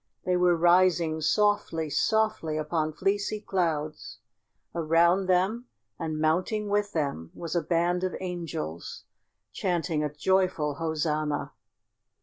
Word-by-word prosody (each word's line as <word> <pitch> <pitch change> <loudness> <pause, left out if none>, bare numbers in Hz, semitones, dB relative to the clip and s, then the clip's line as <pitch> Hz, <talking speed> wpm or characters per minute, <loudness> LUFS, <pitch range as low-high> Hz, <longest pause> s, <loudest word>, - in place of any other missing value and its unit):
They 180 - +2
were 180 -1 +3
rising 175 -2 +3
softly, 205 -2 +1
softly 215 -8 +1
upon 155 0 -1
fleecy 200 +5 -1
clouds. 160 - -2 0.6
Around 170 +3 +3
them 195 +7 +1 0.3
and 155 -1 -3
mounting 185 +7 0
with 205 0 0
them 140 - -2
was 170 0 -5
a 170 - +2
band 175 +2 0
of 185 - -1
angels 165 - -5 0.5
chanting 170 - -1
a 150 - -2
joyful 175 -2 +1
Hosanna! 155 -2 -1
170 Hz, 115 wpm, -27 LUFS, 155-185 Hz, 0.6 s, were